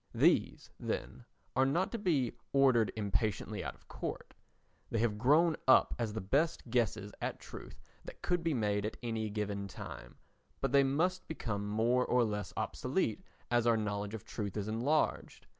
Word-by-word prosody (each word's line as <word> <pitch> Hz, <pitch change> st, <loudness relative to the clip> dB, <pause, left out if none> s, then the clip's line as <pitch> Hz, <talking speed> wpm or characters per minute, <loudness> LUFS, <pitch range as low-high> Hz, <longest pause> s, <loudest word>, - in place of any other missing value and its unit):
These, -, -, +2 dB
then, -, -, -4 dB, 0.3 s
are 130 Hz, -, +4 dB
not 155 Hz, +8 st, +1 dB
to 235 Hz, -, -3 dB
be 150 Hz, -, +1 dB, 0.2 s
ordered 130 Hz, -5 st, +4 dB
impatiently 105 Hz, 0 st, -1 dB
out -, -, -5 dB
of -, -, -25 dB
court; -, -, -6 dB, 0.6 s
they -, -, -1 dB
have 110 Hz, -2 st, +1 dB
grown 155 Hz, +7 st, +4 dB
up 130 Hz, -, +6 dB
as 115 Hz, -2 st, -1 dB
the 110 Hz, -, -3 dB
best 140 Hz, -, +1 dB
guesses 110 Hz, -4 st, 0 dB
at -, -, -3 dB
truth -, -, -10 dB, 0.3 s
that -, -, -11 dB
could 175 Hz, -1 st, +1 dB
be 165 Hz, -3 st, +1 dB
made 105 Hz, -3 st, +1 dB
at 110 Hz, -, -3 dB
any 110 Hz, -2 st, -2 dB
given 100 Hz, -1 st, -3 dB
time, -, -, -9 dB, 0.4 s
but 135 Hz, -, -1 dB
they 140 Hz, 0 st, +6 dB
must 170 Hz, +7 st, 0 dB
become 105 Hz, -9 st, -3 dB
more 115 Hz, +4 st, +2 dB
or 125 Hz, -1 st, +3 dB
less 105 Hz, -4 st, -2 dB
obsolete -, -, -1 dB, 0.3 s
as 120 Hz, -1 st, +3 dB
our 115 Hz, -1 st, +5 dB
knowledge 105 Hz, 0 st, -2 dB
of 110 Hz, -, -8 dB
truth 105 Hz, -2 st, -4 dB
is 105 Hz, 0 st, -2 dB
enlarged. 125 Hz, +8 st, 0 dB
115 Hz, 170 wpm, -33 LUFS, 105-135 Hz, 0.6 s, up